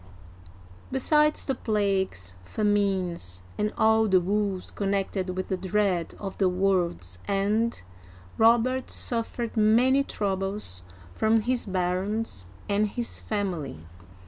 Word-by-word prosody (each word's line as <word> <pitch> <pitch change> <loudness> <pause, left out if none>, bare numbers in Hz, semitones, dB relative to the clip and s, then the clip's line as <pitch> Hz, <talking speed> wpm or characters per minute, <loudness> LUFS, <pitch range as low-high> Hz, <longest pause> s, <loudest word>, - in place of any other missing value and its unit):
Besides 300 +3 +3
the 270 - 0
plagues, 195 - -1
famines, 185 - 0
and 210 0 -1
all 220 0 +4
the 190 -2 +5
woes 195 0 -1
connected 195 -2 -2
with 185 - -3
the 190 - 0
dread 190 -2 0
of 195 -2 -6
the 190 -2 +4
world's 175 - 0
end, 205 - 0 0.5
Robert 240 +3 +3
suffered 235 0 0
many 235 +5 +4
troubles 195 - -3 0.3
from 220 +1 +2
his 245 +1 0
barons 185 - -2 0.2
and 205 +1 +2
his 235 +3 -2
family. 175 - -3
200 Hz, 110 wpm, -26 LUFS, 185-220 Hz, 0.5 s, the